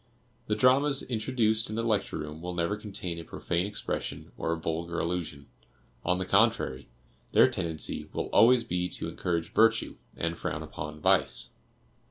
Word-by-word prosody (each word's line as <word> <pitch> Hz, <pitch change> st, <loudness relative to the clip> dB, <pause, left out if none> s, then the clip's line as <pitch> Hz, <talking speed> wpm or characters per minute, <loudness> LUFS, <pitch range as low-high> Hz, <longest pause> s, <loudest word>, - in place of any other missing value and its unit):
The 105 Hz, -, +1 dB
dramas 135 Hz, +4 st, +4 dB
introduced 110 Hz, -2 st, +1 dB
in 110 Hz, -, -4 dB
the 115 Hz, -, -1 dB
Lecture 105 Hz, -4 st, 0 dB
Room 75 Hz, +1 st, -6 dB
will 90 Hz, 0 st, -5 dB
never 85 Hz, +4 st, 0 dB
contain 95 Hz, -5 st, -5 dB
a -, -, -7 dB
profane 85 Hz, +3 st, -2 dB
expression 105 Hz, -, -4 dB
or 80 Hz, -, -2 dB
a 85 Hz, -, 0 dB
vulgar 85 Hz, +1 st, -3 dB
allusion; 85 Hz, -5 st, -3 dB, 0.6 s
on 90 Hz, +1 st, +1 dB
the 95 Hz, -, -2 dB
contrary, 100 Hz, -, +2 dB, 0.4 s
their -, -, +7 dB
tendency 80 Hz, -2 st, -3 dB
will -, -, -2 dB
always 120 Hz, +1 st, +6 dB
be 90 Hz, 0 st, -2 dB
to -, -, -4 dB
encourage 85 Hz, -2 st, -2 dB
virtue, 115 Hz, +1 st, +3 dB, 0.2 s
and 85 Hz, 0 st, -2 dB
frown -, -, -3 dB
upon 75 Hz, 0 st, -7 dB
vice. 60 Hz, -4 st, +2 dB
90 Hz, 160 wpm, -29 LUFS, 85-110 Hz, 0.6 s, their